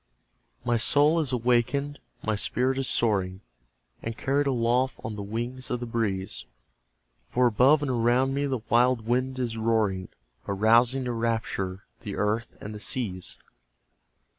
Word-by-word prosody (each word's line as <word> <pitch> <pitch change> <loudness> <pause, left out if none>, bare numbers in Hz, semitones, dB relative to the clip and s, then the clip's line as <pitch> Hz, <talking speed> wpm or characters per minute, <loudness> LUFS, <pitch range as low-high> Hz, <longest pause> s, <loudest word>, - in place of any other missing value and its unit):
My 120 -1 +2
soul 145 +7 +4
is 150 -5 0
awakened, 125 +4 +1 0.2
my 110 - 0
spirit 130 +5 0
is 135 - 0
soaring 95 -4 +1 0.6
And 115 0 -5
carried 140 +1 +1
aloft 125 0 +1
on 110 - -4
the 105 - -5
wings 120 +5 -4
of 125 - -1
the 120 - -4
breeze; 100 - -2 0.8
For 125 - 0
above 130 +6 +4
and 135 - -1
around 125 +3 +2
me 140 +1 0
the 130 -4 -2
wild 120 -1 +3
wind 130 +2 0
is 120 -3 -2
roaring, 110 -5 +1 0.4
Arousing 115 +6 +3
to 125 - -1
rapture 110 -5 -2 0.2
the 100 - -6
earth 105 +3 -1
and 105 - -7
the 105 - -7
seas. 105 -6 -3
120 Hz, 145 wpm, -27 LUFS, 110-130 Hz, 0.8 s, soul